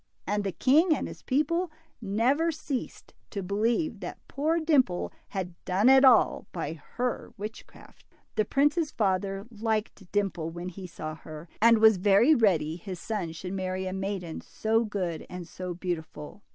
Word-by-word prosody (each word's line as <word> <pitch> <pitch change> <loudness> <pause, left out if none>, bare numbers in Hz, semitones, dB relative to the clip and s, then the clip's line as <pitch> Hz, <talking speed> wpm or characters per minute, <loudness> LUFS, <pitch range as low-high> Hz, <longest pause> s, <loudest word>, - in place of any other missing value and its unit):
And 205 +1 0
the 195 - -1
king 310 - +4
and - - -3
his - - -10
people 330 +6 +1 0.3
never 245 +11 +2
ceased 290 -4 -5 0.2
to 200 -3 -4
believe 220 - 0
that 180 - -6
poor 315 +4 0
Dimple 275 - +2
had 185 -3 -4
done 195 +7 +3
it 265 0 +7
all 250 -5 +5
by 160 -3 -3
her 235 +10 -4
witchcraft. 210 +2 -10 0.3
The 215 - +3
prince's 295 - +2
father 195 -3 -1
liked 215 -3 -3
Dimple 195 -6 -1
when 175 +2 -6
he 185 +1 -8
saw 155 -2 -6
her, 155 +1 -10
and 230 +1 +7
was 220 -2 +6
very 205 - +5
ready 170 - +2
his 180 0 -7
son 200 -7 -3
should 180 +3 -6
marry 185 0 -2
a 185 - -3
maiden 190 -3 -4
so 225 +1 0
good 185 -6 -3
and 180 -2 -7
so 180 -1 -6
beautiful. 170 0 -5
200 Hz, 160 wpm, -28 LUFS, 180-240 Hz, 0.3 s, it